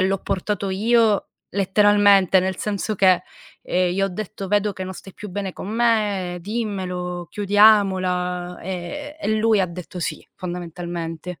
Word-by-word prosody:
l'ho 190 +1 +2
portato 195 +1 -2
io 220 +1 +2 0.2
letteralmente, 200 -1 +4
nel 190 0 -2
senso 210 +1 -2
che, 185 -1 +4 0.4
ehm, 180 -1 +1
gli 195 +2 0
ho 195 - +2
detto: 195 +1 -6
"Vedo 205 +1 +2
che 190 0 -6
non 185 - -6
stai 195 +1 -12
più 210 - -8
bene 195 0 -4
con 190 - -8
me. 210 -6 +1
Dimmelo. 180 -4 -3
Chiudiamola." 185 -4 +3
Ehm, 190 - -5
e 220 -7 0
lui 220 -1 +3
ha 185 - +2
detto: 180 +1 -8
"Sì." 160 - -4
Fondamentalmente. 175 -2 -6
190 Hz, 145 wpm, -22 LUFS, 180-210 Hz, 0.4 s, letteralmente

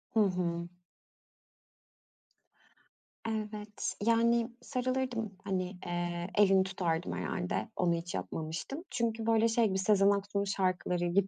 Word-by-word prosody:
Hı - - +5
hı. 175 -4 +1 2.6
Evet, 210 -1 -3
yani, 230 +1 +3
sarılırdım, 255 -4 -1
hani, 185 -1 -2
eee, 175 0 -2
elini 195 -2 +6
tutardım 165 - -1
herhâlde. 90 0 -2
Onu 175 -2 +2
hiç 170 +1 -3
yapmamıştım. 165 - -4
Çünkü 225 -1 -1
böyle 225 0 +4
şey 230 0 +3
gibi 190 -1 0
Sezen 195 0 +4
Aksu'nun 200 0 +1
şarkıları 185 -2 0
gibi 190 +3 +2
195 Hz, 110 wpm, -32 LUFS, 175-225 Hz, 2.6 s, elini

